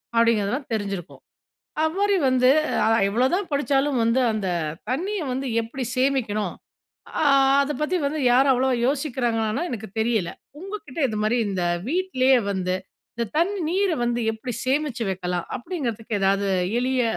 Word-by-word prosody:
அப்பிடிங்கிறதெல்லாம் 230 +3 +2
தெரிஞ்சிருக்கும். 200 -5 -4 0.6
அப்படி 395 +5 +1
வந்து 255 0 +4 0.4
அ - - +3 0.2
எவ்ளோதான் 265 - +1
படிச்சாலும் 280 -2 +1
வந்து 230 +3 +2
அந்த 210 -3 -2 0.4
தண்ணீய 375 +10 -1
வந்து 265 +2 -3
எப்பிடி 240 +3 -5
சேமிக்கணும். 230 -7 0 0.7
ஆ - - +2 0.4
அத 280 +1 -2
பத்தி 320 +5 0
வந்து 300 +2 -2
யாரும் 265 +2 +5
அவ்ளோவா 260 0 +2
யோசிக்கிறாங்லான்னா 245 -4 0
எனக்கு 220 -2 -5
தெரியல. 220 -6 +1 0.3
உங்க 390 +3 -7
கிட்ட 260 - -10
இதுமாரி 215 +2 0
இந்த 185 -3 -1 0.2
வீட்லயே 270 -7 +3
வந்து 185 -2 -1 0.4
இந்த 235 - 0
தண்ணீ 380 +5 +1
நீர 385 +2 +1
வந்து 240 0 0
எப்பிடி 230 +2 -6
சேமிச்சு 270 -2 0
வைக்கலாம் 180 -2 -3
அப்பிடிங்கிறதுக்கு 235 - -3
எதாவது 195 +1 +2 0.3
எளிய 255 0 +1
255 Hz, 135 wpm, -24 LUFS, 220-285 Hz, 0.7 s, யாரும்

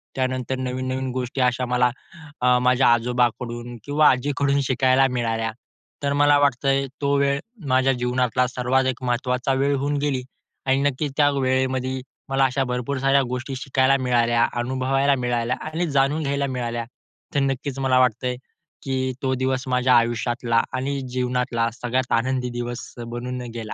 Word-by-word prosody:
त्यानंतर 130 0 -1
नवीन-नवीन 130 0 -3
गोष्टी 130 +1 -3
अशा 125 0 +1
मला 125 0 +3 0.5
अ, 125 0 +4
माझ्या 125 +1 +3
आजोबाकडून 120 0 -1
किंवा 150 +1 +4
आजीकडून 140 +2 +1
शिकायला 130 +1 +4
मिळाल्या. 115 -2 -1 0.5
तर 140 - +1
मला 145 0 +5
वाटतंय, 135 0 +2 0.2
तो 140 0 +2
वेळ 140 0 +2 0.3
माझ्या 130 +1 +3
जीवनातला 125 0 0
सर्वात 130 +2 0
एक 125 - -12
महत्त्वाचा 125 +2 0
वेळ 140 +2 +1
होऊन 145 +2 -1
गेली 140 -3 -1 0.4
आणि 135 +1 +3
नक्कीच 145 0 -1
त्या 145 -1 +5
वेळेमध्ये 130 -1 0 0.3
मला 135 0 +3
अशा 135 +1 0
भरपूर 125 +2 -2
साऱ्या 135 +1 +3
गोष्टी 130 +2 -4
शिकायला 135 0 +2
मिळाल्या, 120 -2 +3
अनुभवायला 130 +3 +1
मिळाल्या 120 -1 -1
आणि 165 +2 -2
जाणून 140 +3 +2
घ्यायला 140 0 0
मिळाल्या. 120 -2 -3 0.5
तर - - +4
नक्कीच 135 0 -2
मला 130 -1 +3
वाटतंय 125 0 +1 0.5
की 130 -1 -1
तो 130 - +1
दिवस 130 0 -1
माझ्या 125 0 +3
आयुष्यातला 120 0 +1
आणि 135 +2 -2
जीवनातला 125 -2 0
सगळ्यात 125 +1 -1
आनंदी 125 +1 -1
दिवस 120 0 -5
बनून 120 +2 -5
गेला 110 -2 -5
130 Hz, 145 wpm, -23 LUFS, 125-135 Hz, 0.5 s, मला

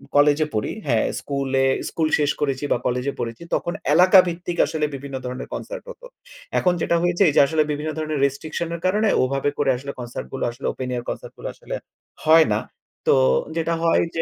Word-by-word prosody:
কলেজে 145 +1 +5
পড়ি 105 - -1 0.2
হ্যাঁ। 115 -4 +2
স্কুলে 135 -1 0 0.2
স্কুল 160 -2 0
শেষ 145 -1 +2
করেছি 140 -1 -1
বা - - +4
কলেজে 125 +3 0
পড়েছি 115 +7 -4
তখন 175 - -2 0.2
এলাকাভিত্তিক 180 -1 +4
আসলে 155 -2 -1
বিভিন্ন 140 0 -7
ধরনের 125 +1 -5
কনসার্ট - - -6
হতো। - - -11 0.5
এখন 180 -1 +2
যেটা 170 - +2
হয়েছে 175 +2 0
এইযে 145 - +5
আসলে 155 0 +2
বিভিন্ন 150 +2 -3
ধরণের 155 -2 -2
রেস্ট্রিকশন 155 +4 -3
এর 170 - -8
কারণে 210 +4 +2 0.2
ওভাবে 135 +2 0
করে 140 -2 +1
আসলে 140 +2 -6
কনসার্ট 120 0 -6
গুলা 135 - -2
আসলে 120 +4 -10
ওপেন 130 -1 -5
এয়ার 120 -1 -3
কনসার্ট - - -6
গুলা - - -5
আসলে - - -6 0.5
হয় 160 0 +7
না। 105 - +1 0.5
তো - - +6 0.4
যেটা 165 +1 0
হয় 165 - +4
যে 165 - +1
150 Hz, 185 wpm, -22 LUFS, 135-170 Hz, 0.5 s, হয়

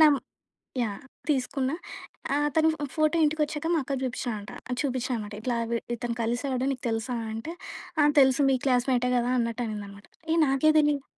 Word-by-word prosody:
నం 300 -2 +8 0.7
యాహ్, 205 -3 -3 0.3
తీసుకున్నా 270 +1 0 0.6
ఆ! - - +3
అతను 320 +2 +3
ఫో 295 - -4
ఫోటో 310 +1 +2
ఇంటికి 310 +1 +1
వచ్చాక 295 +1 -5
మా - - +3
అక్కకు 270 0 -3
చూపిచయంట 240 -4 -3 0.3
చూపిచ్చానామాట. 250 -6 -2
ఇట్లా 240 +1 -1
విడ్ 235 - -1
ఇతను 235 0 -3
కలిసాడు 250 +3 -1
నీకు 260 - -7
తెలుసా 225 +3 -1 0.2
అంటే? 225 +10 -5 0.5
ఆ! - - +6 0.2
తెలుసు 265 +1 +5
మీ 265 - +4
క్లాస్‌మేటే 250 -1 +2
కదా 240 +1 0
అన్నట్టు 230 0 -1
అనిందనమాట. 205 -2 -7 0.3
ఏ - - +3
నాకే 270 +3 +4
తెలీదు. 295 -2 +3
255 Hz, 160 wpm, -27 LUFS, 235-285 Hz, 0.7 s, నం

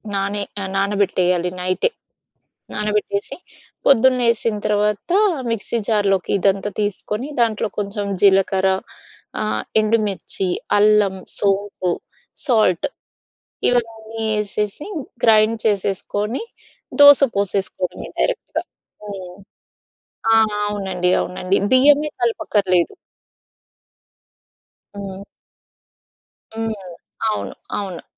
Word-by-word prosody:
నానే 200 +1 -1 0.2
ఆహ్, 190 0 -4
నానబెట్టేయాలి 185 -3 +1
నైటే. 185 - +1 0.9
నానబెట్టేసి 210 -1 -2 0.5
పొద్దున్న 260 -1 +5
లేసిన 230 -2 +1
తర్వాత 210 - 0 0.4
మిక్సీ 230 +1 -1
జార్‌లోకి 200 -4 +1
ఇదంతా 195 +1 +1
తీసుకొని 210 +4 -3
దాంట్లో 225 -2 +1
కొంచెం 205 0 -2 0.2
జీలకర్ర, 195 -1 +4 0.7
ఆహ్, 215 - -1 0.2
ఎండుమిర్చి, 210 -3 0 0.3
అల్లం, 210 -2 +4 0.2
సోంపు, 200 -2 0 0.6
సాల్ట్, 215 -9 +3 0.8
ఇవన్నీ 225 -2 -2 0.2
యేసేసి 210 +4 -3 0.4
గ్రైండ్ 220 0 +5
చేసేసుకొని 205 - -1 0.6
దోస 285 -1 +9
పోసేసుకోడమే 195 -2 -2
డైరెక్ట్‌గా. - - -1 0.5
హ్మ్. 185 -2 -8 1.0
ఆ! - - +6 0.3
అవునండి, 190 -3 -1
అవునండి. 185 +1 -1
బియ్యమే 290 +3 +5
కలపక్కర్లేదు. 195 -6 +1 2.0
హ్మ్. 195 -1 -7 1.3
హ్మ్. 225 0 -2 0.6
అవును, 215 - -3 0.3
అవును. 190 -4 -6
205 Hz, 80 wpm, -20 LUFS, 195-225 Hz, 2.0 s, దోస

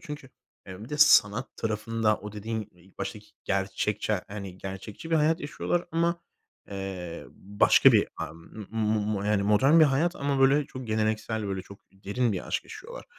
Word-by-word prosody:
Çünkü, 150 -3 -8 0.4
eee, 95 +3 -9
bir - - -12
de 150 0 -4
sanat 120 -3 +5
tarafında 110 0 0
o 105 0 -8
dediğin 110 0 -4
ilk 90 +2 -23
baştaki 105 0 -5 0.2
gerçekçi, 100 +2 -1 0.2
hani, 100 -3 -7
gerçekçi 100 - -8
bir 165 - +4
hayat 160 +3 +2
yaşıyorlar, 170 +4 -2
ama, 170 +1 +1 0.5
eee, 95 -3 -6
başka 100 +2 +4
bir - - +4
a - - -4
m 90 +5 -11
m 105 -2 0
yani 105 -1 +2
modern 130 +11 +5
bir - - +9
hayat 155 +6 +1
ama, 140 -1 -1
böyle, 140 +2 +4
çok 130 -2 -8
geleneksel, 110 0 -1
böyle, 95 -1 -3
çok 100 +1 -13
derin 105 +4 -1
bir 95 - -4
aşk - - -1
yaşıyorlar. 485 +2 -10
110 Hz, 170 wpm, -27 LUFS, 100-135 Hz, 0.5 s, bir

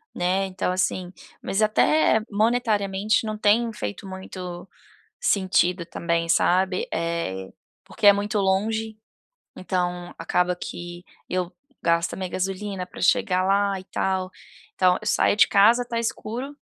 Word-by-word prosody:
né, 185 +2 +1
então 185 -1 -2
assim, 185 -1 -1 0.3
mas 195 +3 -1
até 220 +2 +3
monetariamente 215 -2 +1
não 215 0 -3
tem 225 +2 +2
feito 105 - -6
muito 185 -2 -7 0.6
sentido 180 -3 +1
também 170 -1 -2
sabe, 185 +2 +2
eh, 165 - -2 0.4
porque 205 - +2
é 205 - +10
muito 205 +1 -1
longe, 220 +3 0 0.6
então 180 -1 -3
acaba 180 0 +1
que 175 0 -8 0.2
eu 180 -1 -2 0.3
gasto 170 0 +1
a - - -4
minha 185 -1 -4
gasolina 190 +1 -3
para - - -11
chegar 185 -3 +2
lá 195 0 +1
e - - -11
tal, 190 -1 -1 0.5
então 180 -1 +3
eu 215 - -6
saio - - +3
de 210 - +5
casa 220 +5 +5
está 240 -1 -4
escuro, 240 +4 -4
190 Hz, 135 wpm, -24 LUFS, 180-210 Hz, 0.6 s, é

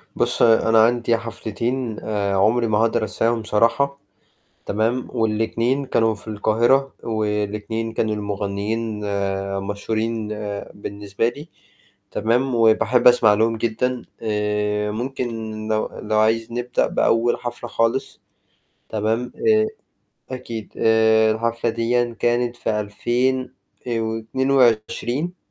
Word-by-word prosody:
بُص - - 0
أنا 115 -1 +5
عندي 120 0 +2
حفلتين 115 +1 -3
آآ 100 -2 -1
عمري 115 +4 +3
ما 105 -1 +1
هاقدر 115 +1 +2
أنساهم 115 +2 0
صراحة 115 +7 +1 0.7
تمام، 115 +4 0
والاتنين 115 +4 0
كانوا 115 -3 +2
في 110 +1 -13
القاهرة، 120 +6 +2
والاتنين 105 0 -2
كان 110 -1 0
المغنيين 105 +2 -3 0.6
مشهورين 110 +2 -2 0.5
بالنسبة 100 +2 -3
لي 145 +6 -8 0.6
تمام، 120 +4 +1
وباحب 115 +2 +4
أسمع 110 -4 +5
لهم 115 +2 +1
جدًا 120 +3 -1 0.2
آآ 105 -1 -1
ممكن 125 +3 -3 0.4
لو 110 0 0
لو 110 0 0
عايز 110 +1 +2
نبدأ 120 +1 0
بأول 115 +1 +2
حفلة 120 0 -6
خالص 115 +3 -1 0.7
تمام، 110 +3 -1
آآ 435 -1 +3 0.7
أكيد 115 -4 -7
آآ 110 0 +4
الحفلة 115 +1 -1
ديًا 115 +1 0
كانت 120 0 +1
في 105 -2 -1
2000 125 +5 -1 0.3
آآ 115 -1 0
و22 120 +6 0
115 Hz, 110 wpm, -22 LUFS, 110-120 Hz, 0.7 s, أنا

